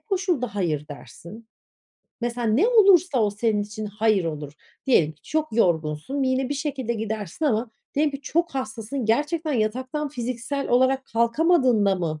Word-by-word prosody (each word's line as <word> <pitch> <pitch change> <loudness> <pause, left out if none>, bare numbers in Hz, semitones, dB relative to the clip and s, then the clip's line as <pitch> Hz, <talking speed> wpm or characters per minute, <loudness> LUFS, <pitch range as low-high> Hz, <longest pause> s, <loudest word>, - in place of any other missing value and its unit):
koşulda 360 - -1
"hayır" 155 -7 -1
dersin? 210 +9 -11 0.7
Mesela 240 0 -2
ne 250 - +3
olursa 380 - +5
o 210 - +2
senin 210 0 0
için 210 +1 -6
"hayır" 210 -2 +1
olur? 150 -3 -5 0.3
Diyelim 165 - +3
ki 155 - -32
çok 310 0 -1
yorgunsun 170 - 0
ve - - +1
yine 260 0 0
bir 290 - -2
şekilde 275 -5 -3
gidersin 220 - -4
ama 230 -3 0 0.2
diyelim 295 +1 +2
ki 275 0 -7
çok 340 +4 0
hastasın. 260 -1 -4
Gerçekten 300 +7 0
yataktan 260 +6 -1
fiziksel 255 +1 -4
olarak 260 +2 +3
kalkamadığında 235 - +2
mı 160 -4 -3
240 Hz, 150 wpm, -24 LUFS, 210-285 Hz, 0.7 s, olursa